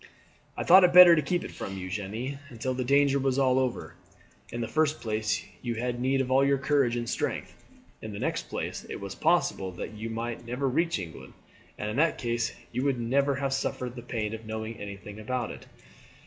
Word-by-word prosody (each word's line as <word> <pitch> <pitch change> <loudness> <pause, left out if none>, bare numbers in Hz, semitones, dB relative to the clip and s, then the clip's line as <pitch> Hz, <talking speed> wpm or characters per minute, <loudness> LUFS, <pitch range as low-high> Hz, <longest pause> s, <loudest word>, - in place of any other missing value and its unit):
"I - - -1
thought 185 +2 +8
it 175 -1 +5
better 180 -1 +11
to 155 - +2
keep 175 +5 -1
it - - -7
from 95 0 -6
you, 90 -1 -5
Jeanne, 110 +8 -4
until 130 0 -3
the 130 0 -2
danger 140 +2 +3
was 135 -1 0
all 130 -1 +3
over. 130 -2 -2 0.6
In 120 - -4
the 115 - -2
first 155 +4 +1
place 110 -2 -1 0.2
you 120 -2 -3
had 120 +1 -2
need 135 +1 +2
of 130 -1 -3
all 135 +1 +5
your 140 0 +3
courage 135 -3 +2
and 120 -1 -3
strength; - - -3 0.5
in 110 - -6
the 100 - -6
next - - -2
place - - -4
it - - -5
was - - -6
possible 95 -1 +1
that 90 - -6
you 110 +2 -6
might 115 +1 -4
never 125 +4 -2
reach 165 +5 +1
England, 85 -4 -8 0.4
and 105 0 -3
in 110 - -4
that 165 +3 +3
case 120 -1 -1 0.2
you 125 +2 -2
would 135 -3 +1
never 135 +4 +1
have 135 0 -1
suffered 125 -2 -2
the 120 - -7
pain 115 -3 -3
of 110 0 -6
knowing 110 +1 -4
anything 100 +1 -8
about 120 +2 -2
it." - - -11
125 Hz, 215 wpm, -28 LUFS, 110-140 Hz, 0.6 s, better